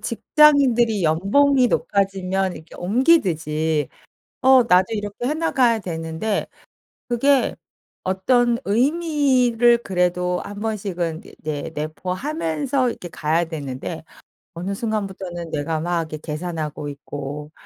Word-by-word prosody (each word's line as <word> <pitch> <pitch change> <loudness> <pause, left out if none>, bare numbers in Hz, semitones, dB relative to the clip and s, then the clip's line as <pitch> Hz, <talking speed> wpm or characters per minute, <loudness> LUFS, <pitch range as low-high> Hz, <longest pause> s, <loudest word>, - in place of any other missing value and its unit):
직장인들이 240 -5 +3
연봉이 245 - +3
높아지면 195 -4 0
이렇게 160 - -13
옮기듯이 165 - +1 0.5
어 260 -1 +6
나도 185 -4 +4
이렇게 205 +2 -4
해 300 - 0
나가야 260 -8 +2
되는데 165 +3 -3 0.6
그게 265 +3 +2 0.5
어떤 235 +6 +2
의미를 255 -2 +3
그래도 180 -3 0
한번씩은 200 -6 -3
이게 - - -15
내 150 0 -4
내포하면서 190 - -2
이렇게 180 - -7
가야 165 +1 0
되는데 155 0 -6 0.5
어느 180 +3 -4
순간부터는 190 -6 -4
내가 155 +2 -2
막 170 +1 -1
이렇게 155 -1 -6
계산하고 155 -1 -5
있고 145 +1 -7
190 Hz, 275 characters per minute, -22 LUFS, 160-240 Hz, 0.6 s, 어